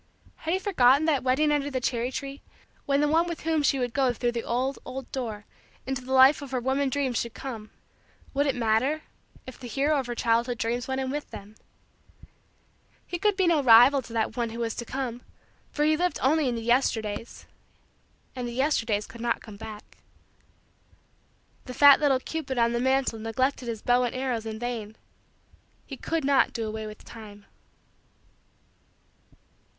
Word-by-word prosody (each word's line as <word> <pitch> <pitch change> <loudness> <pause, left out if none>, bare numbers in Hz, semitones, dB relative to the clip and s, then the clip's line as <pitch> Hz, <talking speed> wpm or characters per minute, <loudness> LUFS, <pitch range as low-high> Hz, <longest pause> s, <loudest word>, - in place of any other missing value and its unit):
Had 325 - -3
he - - -1
forgotten 290 - +4
that 300 -4 +2
wedding 265 +4 +2
under 290 -1 0
the 260 -2 -2
cherry 245 0 -1
tree? 275 +1 -6 0.5
When 280 0 +2
the 295 - +3
one 325 +3 +2
with 340 -2 -5
whom 320 -1 +1
she 280 -1 +2
would 245 -2 -2
go 265 -3 +2
through 240 +1 -1
the 235 -1 -3
old, 260 +3 -1
old, 255 0 -8
door 220 -5 -5 0.4
into 265 -1 -3
the 260 - -8
life 265 +3 +6
of 285 - -8
her 255 -1 -1
womanhood 265 +3 0
dreams 265 -4 0
should 235 -1 -5
come, 225 -5 -7 0.6
would 285 +1 +1
it 275 - 0
matter 245 +6 +1 0.4
if 255 - -10
the 250 - -8
hero 285 +5 +1
of 260 - -4
her 240 - -4
childhood 235 +1 +1
dreams 235 +2 -2
went 265 0 -2
in 260 0 -3
with 295 +1 -4
them? 200 +2 -10 1.5
He 350 - -5
could 415 0 +1
be 380 - +3
no 335 -4 +3
rival 250 +2 +7
to 230 -2 -12
that 225 0 -1
one 240 -2 -1
who 225 - -8
was 230 -1 -2
to 235 - -4
come 250 -1 -4 0.5
for 295 - 0
he 310 0 +4
lived 355 -1 0
only 290 +1 +3
in 240 - -2
the 230 - -5
Yesterdays 230 -3 -1 0.9
and 250 -1 -4
the 240 - -6
Yesterdays 235 -6 0
could 235 - -12
not 235 -1 0
come 215 -2 -11
back. 215 -1 -11 1.7
The 250 - -8
fat 285 0 +8
little 280 -4 +3
cupid 285 -2 -5
on 235 0 +2
the 235 - 0
mantle 260 -2 +1
neglected 250 +4 -1
his 225 -2 -5
bow 245 0 +3
and 245 - -4
arrows 250 -4 -2
in 220 0 -5
vain; 225 -2 -5 0.9
he 275 - -7
could 320 +2 -2
not 280 -1 +3
do 225 -2 -3
away 215 0 -5
with 215 0 -11
time. 210 -3 -12
255 Hz, 185 wpm, -26 LUFS, 230-280 Hz, 1.7 s, fat